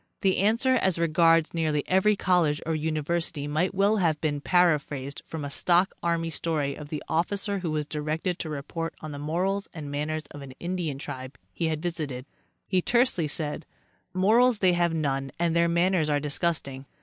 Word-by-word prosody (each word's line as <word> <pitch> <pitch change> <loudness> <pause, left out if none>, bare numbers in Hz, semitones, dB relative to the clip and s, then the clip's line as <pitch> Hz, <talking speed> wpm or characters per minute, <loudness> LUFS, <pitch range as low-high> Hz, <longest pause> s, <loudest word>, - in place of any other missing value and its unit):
The 190 -1 +2
answer 230 +6 +3
as 190 -7 +2
regards 165 0 +3
nearly 155 -3 0
every 190 +3 +3
college 175 -6 +2
or 165 - 0
university 155 0 -1
might 165 +6 0
well 200 +3 +3
have 165 -6 +1
been 145 -3 -1
paraphrased 145 -5 +1
from 155 -3 -5
a 140 - -5
stock 180 +5 +3
army 165 -1 0
story 155 -4 -1
of 145 +1 -9
the 150 - -4
officer 200 +5 -1
who 175 -3 -3
was 155 -1 -1
directed 155 +4 -2
to 160 - -4
report 155 +3 -4
on 155 - -6
the 145 - -6
morals 185 +7 -1
and 150 -3 -6
manners 150 +2 -2
of 145 - -9
an 135 -2 -9
Indian 175 -5 -3
tribe 130 -2 -7 0.2
he 165 - -1
had 155 0 -2
visited. 150 -7 -3 0.4
He 185 -2 +1
tersely 240 - +2
said: 150 +1 -3 0.3
" - - -40
Morals 220 +6 +4
they 185 -3 +3
have 175 -1 +2
none 135 -4 -1
and 170 -1 +1
their 170 0 +3
manners 170 -2 +2
are 145 -1 +2
disgusting." 145 -3 -2
165 Hz, 185 wpm, -27 LUFS, 150-180 Hz, 0.4 s, Morals